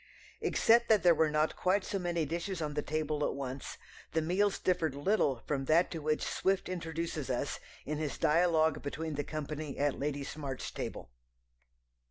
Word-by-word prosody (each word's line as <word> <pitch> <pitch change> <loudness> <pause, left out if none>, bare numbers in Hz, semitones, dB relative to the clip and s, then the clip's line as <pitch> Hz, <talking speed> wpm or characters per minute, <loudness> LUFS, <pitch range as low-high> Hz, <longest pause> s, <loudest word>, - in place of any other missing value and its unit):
Except 235 +1 +4
that 215 -5 +5
there 175 -1 +7
were 160 -1 +3
not 150 +1 +1
quite 185 +2 +2
so 195 - -2
many 170 -3 0
dishes 170 +4 -3
on 150 -2 -2
the 150 - 0
table 155 -1 -1
at - - 0
once 135 -1 -5 0.4
the 160 - +2
meals 190 +5 +2
differed 165 -6 0
little 145 - +1
from 135 -2 -1
that 165 +5 +4
to 165 - -3
which 155 0 0
Swift 195 0 0
introduces 165 -4 -3
us 130 +2 -1 0.3
in 150 0 -2
his 155 -2 -2
dialogue 160 -1 +3
between 155 +2 -4
the 145 0 -2
company 155 -1 -5
at 145 -1 0
Lady 145 0 -2
Smart's 140 -2 -5
table. - - -6
155 Hz, 175 wpm, -32 LUFS, 145-175 Hz, 0.4 s, there